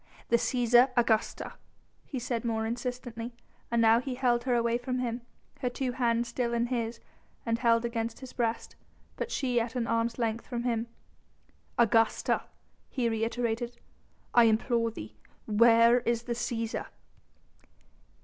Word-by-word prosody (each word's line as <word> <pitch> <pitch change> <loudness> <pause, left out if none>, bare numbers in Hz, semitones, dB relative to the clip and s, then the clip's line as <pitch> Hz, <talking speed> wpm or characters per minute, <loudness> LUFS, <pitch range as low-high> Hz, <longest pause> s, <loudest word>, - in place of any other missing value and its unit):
"The 235 - +5
Cæsar, 240 +2 +4
Augusta," 225 -2 +1 0.5
he 275 - -5
said 240 -1 -2
more 220 -2 -1
insistently, 240 0 -4 0.3
and 235 - +1
now 225 0 +6
he 255 0 -4
held 245 -2 +1
her 250 -2 +2
away 235 0 +1
from 255 +1 -3
him, 245 -1 -2 0.4
her 250 - 0
two 255 0 -2
hands 235 -1 +1
still 235 0 -1
in 235 0 +1
his 230 -1 -2 0.5
and 230 -1 0
held 230 -1 +3
against 230 -1 -3
his 260 -2 -10
breast, 230 -2 -2 0.4
but - - -4
she 250 -3 0
at 230 +1 -3
an 245 -2 0
arm's 230 0 0
length 230 -1 -2
from 240 -2 -3
him. 235 -1 -1 0.9
"Augusta," 225 -1 +3 0.5
he 245 -3 0
reiterated, 235 +1 -2 0.6
"I 240 -1 +7
implore 230 +1 +2
thee! 110 - -9 0.3
Where 230 +2 +6
is 235 -1 -1
the 240 - -2
Cæsar?" 230 -1 -3
235 Hz, 145 wpm, -29 LUFS, 230-245 Hz, 0.9 s, I